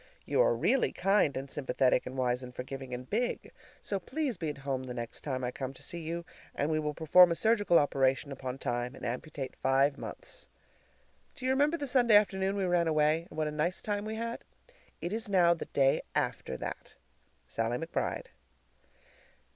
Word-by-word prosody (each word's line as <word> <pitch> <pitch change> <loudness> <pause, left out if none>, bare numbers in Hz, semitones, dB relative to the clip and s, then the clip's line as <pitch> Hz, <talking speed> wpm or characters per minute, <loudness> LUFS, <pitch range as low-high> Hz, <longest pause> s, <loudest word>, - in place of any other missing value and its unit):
You - - +2
are - - +4
really 270 - +2
kind 195 -7 +2
and 135 +1 -4
sympathetic 130 -3 +1
and 130 +1 -6
wise 125 -1 +1
and 125 -1 -9
forgiving 135 0 -6
and 125 +1 -5
big, 240 +4 -2 0.3
so 200 - -1
please 265 - -2
be 165 -3 -3
at 150 - -5
home 135 -1 -2
the 125 -1 -6
next 120 -1 -5
time 130 -3 -3
I 125 - -1
come 135 +1 -5
to - - -8
see 175 - -3
you, 170 +1 -4 0.3
and 145 +3 0
we 155 - +1
will 150 -1 -2
perform 175 +2 +6
a - - +1
surgical 205 -4 +3
operation 135 0 +2
upon 130 -1 -5
Time 120 0 -2
and - - -8
amputate 130 +2 -4
five 135 +2 +2
months. - - -8 0.9
Do 255 - -7
you 260 - +3
remember 290 +5 +3
the 290 - -3
Sunday 245 -4 +4
afternoon 195 -1 +3
we 200 - -1
ran 175 -2 +2
away, 155 +1 +2
and 155 - -12
what 155 -1 0
a - - -2
nice 155 +4 -1
time 205 -1 -2
we 220 +1 -4
had? 230 +1 -3 0.6
It 175 - -3
is 220 -1 -3
now 175 -3 +5
the 170 - -6
day 135 -1 +2
after 65 - -1
that. - - -7 0.5
SALLIE 115 +2 -1
McBRIDE. 170 - -3
155 Hz, 195 wpm, -31 LUFS, 135-200 Hz, 0.9 s, perform